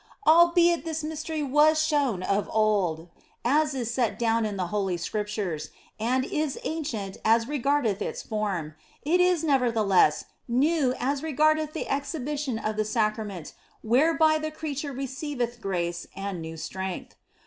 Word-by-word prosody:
Albeit 345 Hz, +1 st, +5 dB
this 320 Hz, -1 st, -3 dB
Mystery 315 Hz, 0 st, -3 dB
was 300 Hz, +3 st, +4 dB
shown 285 Hz, -, +1 dB
of 200 Hz, +2 st, 0 dB
old, 195 Hz, -7 st, +1 dB, 0.4 s
as 295 Hz, +3 st, +2 dB
is 235 Hz, -3 st, -2 dB
set 235 Hz, -3 st, 0 dB
down 230 Hz, -1 st, +1 dB
in 205 Hz, -2 st, -5 dB
the 180 Hz, -2 st, -2 dB
Holv 195 Hz, -3 st, -1 dB
Scriptures, 200 Hz, -5 st, -3 dB, 0.3 s
and 255 Hz, +4 st, +1 dB
is 300 Hz, -2 st, -2 dB
ancient 235 Hz, -12 st, -4 dB
as 225 Hz, +1 st, +3 dB
regardeth 275 Hz, -7 st, 0 dB
its -, -, -4 dB
form, 195 Hz, -8 st, -3 dB, 0.3 s
it 345 Hz, +5 st, +3 dB
is 360 Hz, -3 st, +3 dB
never 270 Hz, -6 st, +2 dB
theless 195 Hz, -8 st, +3 dB, 0.2 s
new 265 Hz, +1 st, +2 dB
as 275 Hz, +2 st, -1 dB
regardeth 310 Hz, 0 st, +2 dB
the 320 Hz, -, -4 dB
exhibition 280 Hz, -2 st, -2 dB
of 215 Hz, -1 st, -3 dB
the 215 Hz, -, +2 dB
Sacrament 215 Hz, -5 st, -2 dB, 0.3 s
whereby 310 Hz, +6 st, +3 dB
the 310 Hz, 0 st, -3 dB
creature 295 Hz, -2 st, -4 dB
receiveth 260 Hz, -2 st, -4 dB
grace 175 Hz, -3 st, -2 dB
and 195 Hz, -3 st, -4 dB
new 160 Hz, 0 st, -7 dB
strength. 190 Hz, +3 st, -5 dB
250 Hz, 145 wpm, -26 LUFS, 210-300 Hz, 0.4 s, Albeit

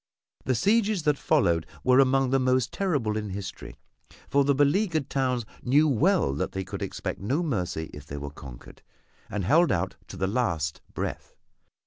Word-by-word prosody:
The 130 Hz, -, +1 dB
sieges 205 Hz, -, +2 dB
that 150 Hz, -2 st, +2 dB
followed 85 Hz, -, +2 dB, 0.2 s
were 130 Hz, +1 st, +5 dB
among 135 Hz, -1 st, +3 dB
the 135 Hz, -, +3 dB
most 130 Hz, -1 st, +1 dB
terrible 145 Hz, -, 0 dB
in 105 Hz, -1 st, -4 dB
history 95 Hz, 0 st, -7 dB, 0.5 s
for 140 Hz, +1 st, +3 dB
the 140 Hz, 0 st, +2 dB
beleaguered 155 Hz, +1 st, +1 dB
towns 125 Hz, -4 st, 0 dB, 0.2 s
knew 145 Hz, +5 st, +4 dB
well 155 Hz, -, +2 dB
they 95 Hz, +7 st, -3 dB
could -, -, -7 dB
expect -, -, -4 dB
no 135 Hz, -, 0 dB
mercy 90 Hz, -, -2 dB
if 75 Hz, 0 st, -10 dB
they 70 Hz, -, -6 dB
were 70 Hz, 0 st, -6 dB
conquered, 65 Hz, -4 st, -12 dB, 0.5 s
and 100 Hz, -3 st, -3 dB
held 160 Hz, -, +4 dB
out 95 Hz, +1 st, -1 dB
to 95 Hz, -, -9 dB
the 95 Hz, -, 0 dB
last 85 Hz, -, -1 dB
breath. -, -, -5 dB
130 Hz, 165 wpm, -27 LUFS, 95-145 Hz, 0.5 s, were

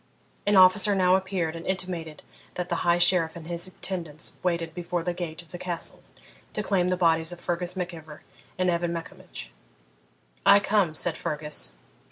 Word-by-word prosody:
An 205 Hz, -, +4 dB
officer 190 Hz, +2 st, +6 dB
now 185 Hz, -1 st, +5 dB
appeared 185 Hz, -4 st, -1 dB
and 165 Hz, -, -7 dB
intimated 175 Hz, -5 st, -3 dB, 0.3 s
that 180 Hz, 0 st, -3 dB
the 170 Hz, -, 0 dB
High 170 Hz, 0 st, +3 dB
Sheriff 175 Hz, -2 st, +3 dB
and 170 Hz, -2 st, -9 dB
his 170 Hz, +2 st, -1 dB
attendants 170 Hz, -4 st, -5 dB
waited 170 Hz, -2 st, -1 dB
before 175 Hz, 0 st, -3 dB
the 175 Hz, -, -1 dB
gate 175 Hz, -1 st, -5 dB
of 165 Hz, -, -18 dB
the 175 Hz, -, -7 dB
Castle 175 Hz, -2 st, -2 dB, 0.5 s
to 210 Hz, -, 0 dB
claim 185 Hz, -3 st, +2 dB
the 180 Hz, -, +1 dB
bodies 165 Hz, -1 st, +4 dB
of 175 Hz, -, -7 dB
Fergus 175 Hz, +1 st, -2 dB
Mac 180 Hz, -1 st, -3 dB
Ivor 155 Hz, -2 st, -11 dB, 0.3 s
and 185 Hz, -1 st, +2 dB
Evan 170 Hz, 0 st, 0 dB
Maccombich. 165 Hz, -, -8 dB, 0.9 s
'I 200 Hz, -, +8 dB
come,' 200 Hz, -6 st, +2 dB
said 165 Hz, +1 st, +1 dB
Fergus. 150 Hz, -, -3 dB
175 Hz, 175 wpm, -27 LUFS, 165-185 Hz, 0.9 s, I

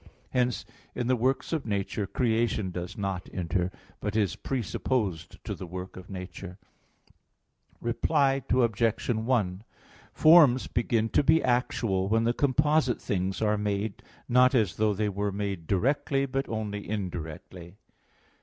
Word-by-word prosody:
Hence 125 Hz, -1 st, 0 dB, 0.3 s
in 120 Hz, -, -2 dB
the 130 Hz, +1 st, +3 dB
works 130 Hz, +6 st, 0 dB
of 155 Hz, -7 st, -2 dB
nature 100 Hz, 0 st, -2 dB
creation 115 Hz, -4 st, 0 dB
does 90 Hz, 0 st, -6 dB
not 95 Hz, -3 st, -3 dB
enter, 90 Hz, +1 st, -1 dB, 0.3 s
but 105 Hz, 0 st, -3 dB
is 105 Hz, -4 st, +1 dB
presupposed 105 Hz, -, -2 dB
to -, -, -3 dB
the 90 Hz, -, -7 dB
work 90 Hz, +2 st, -7 dB
of 95 Hz, 0 st, -11 dB
nature. 90 Hz, -1 st, -8 dB, 1.2 s
Reply 135 Hz, +3 st, +1 dB
Obj. 115 Hz, -2 st, +1 dB
1: 110 Hz, -5 st, 0 dB, 0.5 s
Forms 155 Hz, -6 st, +6 dB
begin 115 Hz, -1 st, 0 dB
to -, -, +3 dB
be 160 Hz, +3 st, +4 dB
actual 115 Hz, -6 st, 0 dB
when 115 Hz, +1 st, +3 dB
the 120 Hz, +1 st, +2 dB
composite 145 Hz, 0 st, +2 dB
things 95 Hz, +1 st, -2 dB
are 105 Hz, -1 st, +2 dB
made, 105 Hz, 0 st, -2 dB, 0.3 s
not 125 Hz, +2 st, +5 dB
as 110 Hz, -8 st, +1 dB
though 105 Hz, -1 st, +2 dB
they 105 Hz, +1 st, 0 dB
were 100 Hz, +1 st, -2 dB
made 100 Hz, -4 st, -4 dB
"directly," 135 Hz, -, +1 dB
but 135 Hz, 0 st, -3 dB
only 105 Hz, -2 st, -4 dB
"indirectly." 90 Hz, -2 st, -6 dB
110 Hz, 135 wpm, -28 LUFS, 95-125 Hz, 1.2 s, Forms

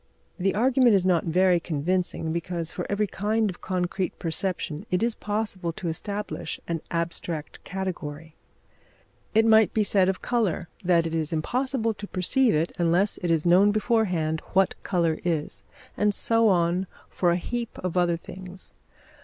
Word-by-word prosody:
The 195 Hz, +2 st, +1 dB
argument 250 Hz, 0 st, +4 dB
is 185 Hz, -2 st, +2 dB
not 180 Hz, -3 st, +2 dB
very 180 Hz, +1 st, +3 dB
convincing, 170 Hz, +1 st, -1 dB
because, 170 Hz, -1 st, -3 dB
for 180 Hz, -, -5 dB
every 205 Hz, +1 st, +1 dB
kind 210 Hz, +1 st, 0 dB
of 175 Hz, -, -14 dB
concrete 185 Hz, 0 st, -2 dB
perception 170 Hz, -2 st, -2 dB
it 180 Hz, +3 st, +1 dB
is 235 Hz, 0 st, +2 dB
possible 205 Hz, -5 st, -2 dB
to 170 Hz, +1 st, -4 dB
establish 205 Hz, +5 st, -4 dB
an 165 Hz, -2 st, -2 dB
abstract 170 Hz, -2 st, -4 dB
category. 165 Hz, -5 st, -5 dB, 1.0 s
It 220 Hz, 0 st, +5 dB
might 220 Hz, -1 st, +5 dB
be 215 Hz, -, +3 dB
said 190 Hz, -2 st, +4 dB
of 190 Hz, -, -1 dB
colour 210 Hz, -8 st, 0 dB, 0.2 s
that 175 Hz, -2 st, +3 dB
it 165 Hz, -, -3 dB
is 160 Hz, -2 st, 0 dB
impossible 235 Hz, -, 0 dB
to 205 Hz, 0 st, -8 dB
perceive 220 Hz, -, +2 dB
it 160 Hz, +3 st, 0 dB
unless 175 Hz, +4 st, +2 dB
it 175 Hz, -, -2 dB
is 165 Hz, -1 st, +1 dB
known 185 Hz, +4 st, +5 dB
beforehand 190 Hz, -8 st, 0 dB
what 190 Hz, 0 st, +3 dB
colour 170 Hz, -4 st, 0 dB
is; 165 Hz, -4 st, -2 dB, 0.3 s
and 210 Hz, -1 st, +2 dB
so 230 Hz, 0 st, +3 dB
on 180 Hz, -1 st, +2 dB, 0.2 s
for 175 Hz, -, 0 dB
a 170 Hz, -, +2 dB
heap 235 Hz, +5 st, -4 dB
of 185 Hz, -1 st, -4 dB
other 175 Hz, -2 st, +2 dB
things. 185 Hz, +2 st, -7 dB
185 Hz, 160 wpm, -26 LUFS, 170-210 Hz, 1.0 s, It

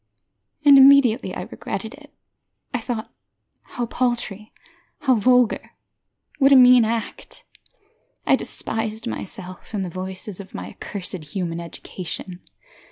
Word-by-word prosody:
And 280 Hz, -1 st, +9 dB
immediately 270 Hz, -3 st, +5 dB
I -, -, -4 dB
regretted -, -, -6 dB
it. -, -, -15 dB, 0.6 s
I 245 Hz, -, 0 dB
thought 230 Hz, -1 st, -5 dB, 0.5 s
how 245 Hz, -, -5 dB
paltry, 235 Hz, -4 st, -2 dB, 0.5 s
how 265 Hz, -3 st, +3 dB
vulgar, 250 Hz, +1 st, +2 dB, 0.6 s
what 275 Hz, 0 st, +5 dB
a -, -, +8 dB
mean 250 Hz, -2 st, +8 dB
act! 225 Hz, 0 st, -5 dB, 0.8 s
I -, -, +5 dB
despised 220 Hz, 0 st, -3 dB
myself 190 Hz, -3 st, -7 dB
and 195 Hz, -2 st, -1 dB
the 175 Hz, -, -6 dB
voices 185 Hz, +2 st, -5 dB
of 195 Hz, -, -11 dB
my 90 Hz, +1 st, -6 dB
accursed 185 Hz, -4 st, -6 dB
human 170 Hz, -3 st, -2 dB
education. 175 Hz, +1 st, -7 dB
220 Hz, 120 wpm, -22 LUFS, 185-250 Hz, 0.8 s, And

